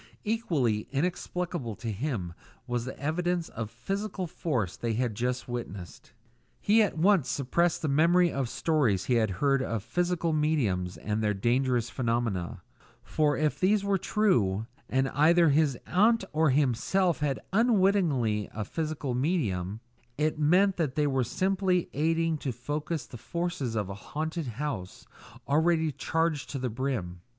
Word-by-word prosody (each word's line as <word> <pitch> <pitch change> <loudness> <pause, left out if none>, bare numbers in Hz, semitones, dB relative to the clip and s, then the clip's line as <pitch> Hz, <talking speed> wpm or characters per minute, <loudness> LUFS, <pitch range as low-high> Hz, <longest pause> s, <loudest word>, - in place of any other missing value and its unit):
Equally 155 - 0
inexplicable 170 - -2
to 115 +1 -4
him 105 - -3 0.3
was 120 -1 -2
the 130 - -7
evidence 175 +3 -1
of 110 -2 -5
physical 195 - -4
force 125 - -2
they 115 -1 -2
had 120 0 0
just 125 +4 -2
witnessed. 100 -7 -7 0.5
He 220 +2 +4
at 200 -6 0
once 175 -5 +3
suppressed 165 +7 0
the - - +1
memory 170 +5 +4
of 135 -3 -2
stories 130 - +1
he 125 - +1
had 110 -3 +3
heard 135 +8 +1
of 115 -5 -2
"physical 175 +5 0
mediums" 120 - 0
and 105 +1 -2
their 105 -1 +1
dangerous 120 +2 +1
phenomena; 115 -8 -2 0.4
for 150 -3 +1
if 150 0 0
these 200 +2 +3
were 200 -1 +1
true, 115 - +1 0.2
and 130 +1 +2
either 165 +4 +4
his 145 -3 +2
aunt 220 +4 +3
or 155 0 +3
himself 150 +6 +1
was 145 -2 0 0.2
unwittingly 185 - +2
a 110 -1 -3
physical 155 -3 -3
medium, 115 - -1 0.4
it 155 +1 0
meant 180 +6 +4
that 155 -7 -1
they 150 - +2
were 135 -3 +1
simply 185 - 0
aiding 165 +1 +1
to 135 - -2
focus 145 +6 -4
the 120 - -10
forces 170 -4 -3
of 105 -3 -1
a 100 - -5
haunted 155 - -4
house 115 -6 -5 0.4
already 160 +2 +2
charged 160 0 -1
to 140 - -4
the 130 -1 -2
brim. 110 -9 -3
145 Hz, 150 wpm, -28 LUFS, 120-170 Hz, 0.5 s, He